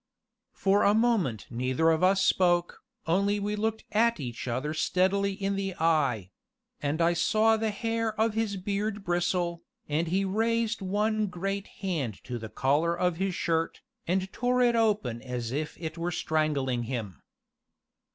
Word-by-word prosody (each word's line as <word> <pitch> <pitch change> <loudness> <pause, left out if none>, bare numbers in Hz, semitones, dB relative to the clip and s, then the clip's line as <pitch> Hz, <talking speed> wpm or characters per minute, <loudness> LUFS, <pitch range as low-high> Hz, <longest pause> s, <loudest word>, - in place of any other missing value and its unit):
For 195 +1 +3
a 205 - +4
moment 215 - +1
neither 130 +7 +1
of 160 - +1
us 190 +1 +4
spoke, 175 -2 +2 0.2
only 200 +5 +2
we 205 +1 -2
looked 220 +1 -2
at 230 0 +3
each 120 -4 -5
other 130 +6 -2
steadily 190 +4 +1
in 195 0 -2
the 195 -2 -3
eye; 140 - +1 0.5
and 145 +2 -1
I 170 +1 +3
saw 220 +5 +3
the 220 0 0
hair 225 +1 -2
of 220 0 +2
his 220 -2 -1
beard 205 +2 -2
bristle, 175 -1 0 0.3
and 155 +3 0
he 190 +4 +1
raised 225 +2 0
one 210 +3 0
great 195 +2 -3 0.2
hand 145 - -2
to 120 -1 -5
the 110 -1 -7
collar 150 +8 +1
of 180 -2 +1
his 190 0 -1
shirt, 165 -2 -1 0.3
and 190 +2 -1
tore 250 +1 +2
it 240 -1 +3
open 205 - +1
as 125 -3 -4
if 150 +3 -3
it 160 0 -5
were 170 +1 -1
strangling 150 -7 0
him. 115 -7 -5
180 Hz, 160 wpm, -28 LUFS, 155-210 Hz, 0.5 s, a